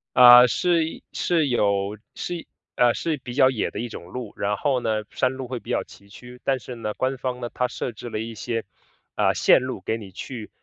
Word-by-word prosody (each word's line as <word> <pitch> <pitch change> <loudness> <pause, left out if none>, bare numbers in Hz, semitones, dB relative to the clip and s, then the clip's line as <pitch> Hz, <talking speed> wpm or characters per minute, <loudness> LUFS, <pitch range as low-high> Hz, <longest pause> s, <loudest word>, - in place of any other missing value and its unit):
呃， 125 0 +10
是 165 +4 0
是 165 -3 +1
有 100 -3 +1 0.2
是 175 -2 -5 0.3
呃， 120 -1 +5
是 160 -2 -2
比 125 -2 -8
较 130 0 +5
野 125 -5 -1
的 - - -5
一 120 - -4
种 85 - -9
路， 115 +4 -7
然 105 +1 0
后 135 +3 +1
呢， 110 -2 -1
山 130 0 0
路 130 0 -6
会 125 - -3
比 - - -14
较 - - 0
崎 100 - -17
岖。 125 +4 -13
但 135 -1 +2
是 125 0 -9
呢， 115 -3 -4
官 130 +3 -1
方 125 -1 -4
呢， 120 - -3
它 125 - 0
设 125 - -4
置 115 +2 -9
了 115 - -4
一 115 +1 -5
些， 115 +1 -3 0.5
呃， - - +3
线 - - +5
路 130 -6 -4
给 110 +4 -2
你 100 -4 -10
去 110 +4 -7
125 Hz, 235 characters per minute, -24 LUFS, 110-130 Hz, 0.5 s, 呃